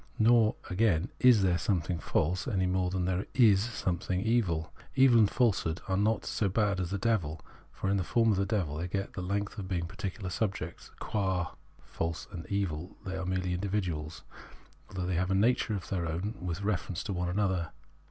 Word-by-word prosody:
Nor, 115 -1 +5
again, 95 -1 +2
is 125 -5 +6
there 90 -2 +2
something 85 0 0
false, 90 - 0
any 95 -7 +1
more 90 0 +1
than 90 -1 -1
there 95 +1 -1
is 105 -7 +6
something 95 -5 -2
evil. 95 -7 0 0.2
Evil 130 -3 +6
and 105 -3 +5
falsehood 95 -9 +1
are 95 - -1
indeed 100 +2 +2
not 110 0 +1
so 105 -3 0
bad 100 -1 +1
as 90 -2 -2
the 100 - -1
devil, 90 -7 0 0.3
for - - -4
in 100 +1 +2
the 95 - 0
form 115 +3 +3
of 100 - +1
the 100 - +1
devil 90 -9 -1
they 85 +3 -2
get 95 +2 -3
the 95 - -4
length 100 +3 -2
of 95 - -5
being 90 -3 -1
particular 95 -1 -5
subjects; 95 -5 -3
qua 95 -4 -1 0.3
false 80 -1 -4
and 85 -3 -7
evil 95 -3 -2
they 95 -1 -3
are 95 -1 -3
merely 95 -1 -1
universals, 90 -5 -2 0.7
though 95 -1 -4
they 90 - -1
have 90 +1 0
a 95 - +2
nature 110 +1 +2
of 95 - -6
their 90 -3 -1
own 90 +7 -2
with 90 +1 -3
reference 95 -3 -1
to 105 - -3
one 90 -1 -1
another. 95 -3 0
95 Hz, 200 wpm, -30 LUFS, 90-105 Hz, 0.7 s, is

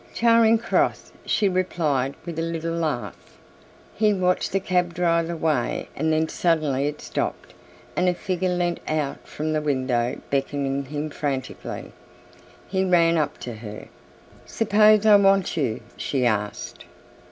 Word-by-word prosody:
"Charing 230 -1 +5
Cross," 235 - 0 0.2
she 210 -2 +2
replied, 155 -8 0
with 170 -2 -5
a - - 0
little 165 0 -3
laugh. 155 -7 -4 0.6
He 210 -1 +2
watched 180 -1 +1
the 195 - +1
cab 180 -2 0
drive 170 -1 +1
away 155 -7 -1
and 160 +2 0
then 160 0 +2
suddenly 155 -6 +1
it 150 0 -5
stopped - - -4 0.4
and 180 0 +2
a 180 - 0
figure 185 0 -2
lent 175 -1 0
out 150 -3 -2
from 155 +1 -3
the 155 - 0
window 130 -4 0
beckoning 140 0 -1
him 150 +2 -4
frantically. 135 -3 -4 0.8
He 190 0 0
ran 170 -2 +4
up 150 -3 0
to 120 - -5
her. 105 -1 -9 0.6
"Suppose 215 -1 +4
I 210 -1 +8
want 195 -2 +3
you," 130 -9 -1 0.2
she 130 -3 -1
asked. 105 -3 -2
165 Hz, 140 wpm, -24 LUFS, 140-185 Hz, 0.8 s, I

